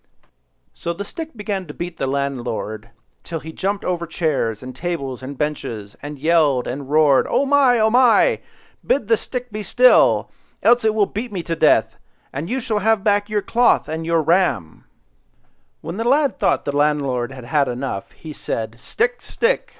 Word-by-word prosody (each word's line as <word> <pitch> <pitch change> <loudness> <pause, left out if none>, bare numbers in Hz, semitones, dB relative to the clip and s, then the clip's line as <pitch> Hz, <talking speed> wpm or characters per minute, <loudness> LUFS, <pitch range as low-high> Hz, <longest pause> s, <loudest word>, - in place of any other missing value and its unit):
So 170 - -4
the 200 +4 -6
stick 320 - -7
began 200 -3 -3
to 150 - -9
beat 175 0 -6
the 135 - -2
landlord 120 -5 -3 0.3
till 165 -1 -5
he 160 +1 -9
jumped 200 +3 -2
over 170 -2 -2
chairs, 140 -10 -1
and 130 0 -8
tables, 140 -5 -4
and 135 +1 -7
benches, 115 -9 -4
and 145 +1 -7
yelled 150 -4 +2
and 135 +1 -5
roared,— 150 -3 +4
"Oh 280 - +2
my! 275 -3 +4
oh 220 0 +3
my! 250 - +4 0.4
bid 245 -6 0
the 225 - +6
stick 250 +2 -6
be 215 +1 -4
still, 250 +5 +4 0.3
else 240 0 +5
it 220 -1 +2
will 210 -2 +4
beat 220 +4 -5
me 185 -4 -4
to 165 - -2
death, - - +3 0.4
and 150 +6 -4
you 260 - -1
shall 225 -4 -1
have 220 0 +2
back 205 0 +2
your 210 -1 0
cloth 240 +1 +2
and 160 +1 -4
your 165 -1 +1
ram, 150 - 0 1.0
When 170 +4 -6
the 225 - -1
lad 280 -1 +2
thought - - +1
the 145 - -2
landlord 140 -4 +1
had 130 -1 -10
got 145 -2 +3
enough, 120 -6 -4
he 155 -2 -10
said— 115 -4 -4
"Stick, 450 - -1
stick! - - -1
165 Hz, 180 wpm, -20 LUFS, 140-220 Hz, 1.0 s, the